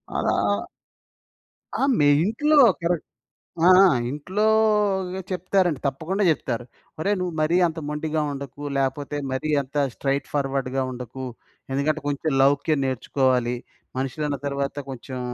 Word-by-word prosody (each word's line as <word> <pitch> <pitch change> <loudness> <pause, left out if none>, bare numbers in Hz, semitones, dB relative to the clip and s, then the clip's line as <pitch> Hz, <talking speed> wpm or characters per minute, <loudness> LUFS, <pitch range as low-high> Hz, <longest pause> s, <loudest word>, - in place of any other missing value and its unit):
అలా 100 - +1 1.3
ఆ! - - -1 0.2
మీ 145 - +5 0.2
ఇంట్లో 295 - +2 0.2
కరెక్ట్. 170 -1 0 0.6
ఆ! - - +7 0.2
ఆ! - - +5 0.2
ఇంట్లోగ 205 +2 +1
చెప్తారండి, 180 -3 +1
తప్పకుండా 160 +9 -2
చెప్తారు. 125 -6 -1 0.4
"ఒరేయ్! 200 +5 +1
నువ్వు 180 -2 -2
మరీ 160 +3 +2
అంత 165 0 -5
మొండిగా 155 +1 -1
ఉండకు, 140 0 -7 0.2
లేకపోతే 135 +2 -1
మరీ, 130 +4 -2
అంత 135 +1 -14 0.2
స్ట్రెయిట్ 140 0 -1
ఫార్వర్డ్‌గా 135 -2 -1
ఉండకు. 125 +1 -7 0.5
ఎందుకంటే, 150 +3 0
కొంచెం 145 +2 -1
లౌక్యం 145 +2 +2
నేర్చుకోవాలి. 130 -1 +1 0.4
మనుషులన్న 140 +2 -2
తర్వాత, 140 -1 -2
కొంచెం 130 0 -6
145 Hz, 115 wpm, -24 LUFS, 135-175 Hz, 1.3 s, ఆ